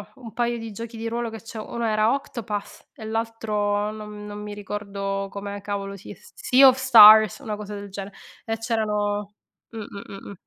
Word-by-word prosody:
un 235 Hz, -4 st, -11 dB
paio 240 Hz, 0 st, -1 dB
di 225 Hz, -1 st, -7 dB
giochi 230 Hz, +2 st, -8 dB
di 225 Hz, +1 st, -4 dB
ruolo 235 Hz, 0 st, -2 dB
che 225 Hz, 0 st, -8 dB
c'ho, 225 Hz, -1 st, -9 dB
uno 235 Hz, 0 st, -2 dB
era 215 Hz, +1 st, +2 dB
Octopas 225 Hz, -7 st, -6 dB
e 220 Hz, -, -9 dB
l'altro 215 Hz, -2 st, -1 dB
non 210 Hz, -1 st, -9 dB
non 205 Hz, 0 st, -7 dB
mi 210 Hz, 0 st, -7 dB
ricordo 200 Hz, -1 st, -4 dB
come 200 Hz, +1 st, -6 dB
cavolo 200 Hz, -1 st, -4 dB
Se 195 Hz, -, -11 dB
Sea 420 Hz, -, +4 dB
of 260 Hz, 0 st, +5 dB
Stars, 220 Hz, -5 st, +8 dB
una 220 Hz, -7 st, -4 dB
cosa 210 Hz, 0 st, -7 dB
del 200 Hz, 0 st, -8 dB
gene 195 Hz, +1 st, -7 dB, 0.3 s
e 225 Hz, 0 st, -3 dB
c'erano 210 Hz, -2 st, -2 dB, 0.3 s
mh, 230 Hz, -, -10 dB
mh, 200 Hz, -2 st, -8 dB
mh, 195 Hz, -, -10 dB
mh. -, -, -8 dB
215 Hz, 190 wpm, -24 LUFS, 205-230 Hz, 0.3 s, Stars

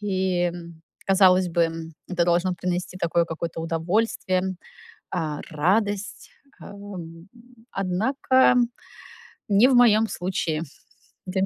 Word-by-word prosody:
и, 190 Hz, -3 st, 0 dB
м, 170 Hz, -2 st, -6 dB, 0.2 s
казалось 185 Hz, -2 st, +4 dB
бы, 170 Hz, 0 st, +1 dB
м, 165 Hz, 0 st, -5 dB, 0.2 s
это 175 Hz, -2 st, +1 dB
должно 175 Hz, +2 st, +1 dB
принести 180 Hz, +1 st, -3 dB
такое 170 Hz, -1 st, +1 dB
какое-то 165 Hz, 0 st, -5 dB
удовольствие, 185 Hz, +2 st, -1 dB, 0.5 s
а, 155 Hz, -4 st, -3 dB
радость, 200 Hz, +6 st, -1 dB, 0.3 s
ам. 185 Hz, -4 st, -10 dB, 0.4 s
Однако 250 Hz, +7 st, +2 dB, 0.9 s
не 205 Hz, +5 st, +5 dB
в 265 Hz, -, +3 dB
моём 225 Hz, -3 st, +5 dB
случае, 175 Hz, -4 st, -2 dB, 0.6 s
дэм 190 Hz, +1 st, 0 dB
185 Hz, 105 wpm, -24 LUFS, 170-200 Hz, 0.9 s, не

